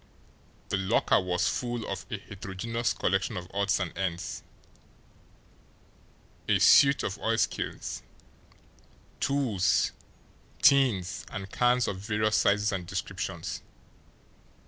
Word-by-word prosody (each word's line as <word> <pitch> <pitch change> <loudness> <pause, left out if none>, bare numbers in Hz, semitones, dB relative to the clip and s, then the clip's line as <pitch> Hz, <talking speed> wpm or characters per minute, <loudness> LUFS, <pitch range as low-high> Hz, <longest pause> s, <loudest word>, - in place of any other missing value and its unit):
The - - +1
locker 95 0 +2
was 90 -1 0
full 120 -3 -2
of - - -5
a - - -3
heterogeneous 100 +3 -4
collection - - 0
of 90 -1 -6
odds 100 0 +1
and 95 -3 -3
ends 85 -2 -3 2.1
a - - +5
suit 140 0 +6
of 100 +1 -3
oilskins, 115 0 -2 1.2
tools, 130 -9 +1 0.7
tins, 130 -10 +3
and 95 0 -6
cans 125 0 +2
of 95 - -3
various 110 +1 +1
sizes 105 0 +2
and 95 -3 -4
descriptions. - - -4
100 Hz, 100 wpm, -28 LUFS, 95-120 Hz, 2.1 s, suit